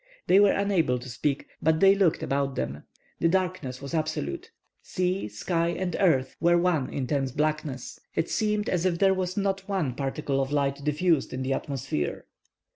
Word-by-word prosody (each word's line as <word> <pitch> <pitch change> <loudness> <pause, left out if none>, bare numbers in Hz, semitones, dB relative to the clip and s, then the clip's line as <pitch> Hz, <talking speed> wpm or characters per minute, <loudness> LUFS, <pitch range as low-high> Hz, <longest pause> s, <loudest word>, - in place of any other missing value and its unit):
They 190 - +5
were 205 0 +6
unable 190 -10 +1
to 125 - -9
speak, 140 +3 -2 0.2
but 160 0 +3
they 195 +1 +7
looked 195 -5 +2
about 140 -1 -1
them. 75 - -4 0.3
The - - +3
darkness 175 -8 -1
was 140 - -6
absolute. 155 - -2 0.3
Sea, 185 - -1
sky, 165 - -1
and 180 +1 -2
earth, 135 -9 +2
were 175 0 +4
one 170 -6 +1
intense 135 0 -1
blackness. 150 -2 -2 0.2
It - - +1
seemed 210 -1 0
as 175 -2 0
if 180 -2 +1
there 195 +1 +4
was 185 0 -2
not 195 -1 -1
one 175 -10 0
particle 135 +1 -1
of 135 +1 -2
light 140 -1 0
diffused 150 +1 +1
in 130 0 -3
the 135 +1 0
atmosphere. 125 - -3
155 Hz, 175 wpm, -27 LUFS, 135-185 Hz, 0.3 s, they